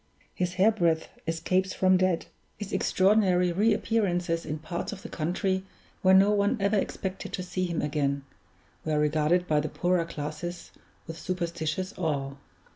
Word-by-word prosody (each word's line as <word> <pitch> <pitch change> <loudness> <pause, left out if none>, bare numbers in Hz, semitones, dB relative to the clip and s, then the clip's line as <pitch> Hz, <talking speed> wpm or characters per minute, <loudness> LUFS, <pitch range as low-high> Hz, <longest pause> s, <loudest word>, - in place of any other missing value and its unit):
His 180 0 -2
hair 195 +4 +5
breadth 170 -6 +1 0.2
escapes 185 +3 0
from 185 0 +4
death; 185 -2 +1 0.3
his 205 -2 -6
extraordinary 185 -2 +3
re 210 +6 +3
appearances 175 -7 0
in 155 0 -2
parts 170 +3 -4
of 200 -2 -8
the - - -7
country 185 +3 -1 0.4
where 190 0 +6
no 195 +2 +6
one 205 +4 +2
ever 200 +2 +2
expected 190 -1 -3
to 185 - -2
see 185 +1 -2
him 170 -2 -2
again, 140 -2 0 0.6
were 155 -1 0
regarded 155 +4 +2
by 150 -1 +3
the 150 +1 -2
poorer 180 -1 +1
classes 160 +2 -6 0.3
with 165 0 -8
superstitious 170 0 -3
awe. 140 -5 -1
180 Hz, 155 wpm, -28 LUFS, 160-190 Hz, 0.6 s, where